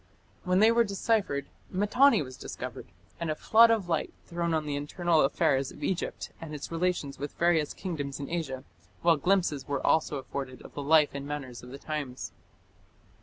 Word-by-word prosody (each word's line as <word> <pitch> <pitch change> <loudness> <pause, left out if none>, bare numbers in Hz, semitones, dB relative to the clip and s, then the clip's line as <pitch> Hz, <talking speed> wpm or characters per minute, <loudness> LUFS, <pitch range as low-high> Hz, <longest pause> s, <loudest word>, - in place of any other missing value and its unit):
When 180 +2 +3
they 220 +1 +7
were 235 0 +4
deciphered, 200 - 0 0.2
Mitanni 210 - +4
was 130 -1 -9
discovered, 125 -1 -7 0.3
and 170 -1 -2
a 155 - 0
flood 230 +7 +6
of 220 -5 +1
light 165 -3 -1
thrown 170 0 -2
on 160 -1 0
the 145 -1 -2
internal 160 +3 +1
affairs 135 0 +2
of - - -11
Egypt 185 - -2
and 155 -2 -6
its 145 - -7
relations 165 -5 -1
with 145 +1 -5
various 170 -3 +2
kingdoms 145 -7 -4
in 140 - -4
Asia, 140 -7 -3 0.4
while 170 -2 +5
glimpses 165 -5 +1
were 140 -2 -2
also 155 -2 +2
afforded 130 -1 -6
of - - -12
the 145 - -4
life 150 +1 +5
and 140 0 -5
manners 140 -5 -5
of 125 - -11
the 135 - -8
times. 140 -4 -5
155 Hz, 180 wpm, -29 LUFS, 140-175 Hz, 0.4 s, they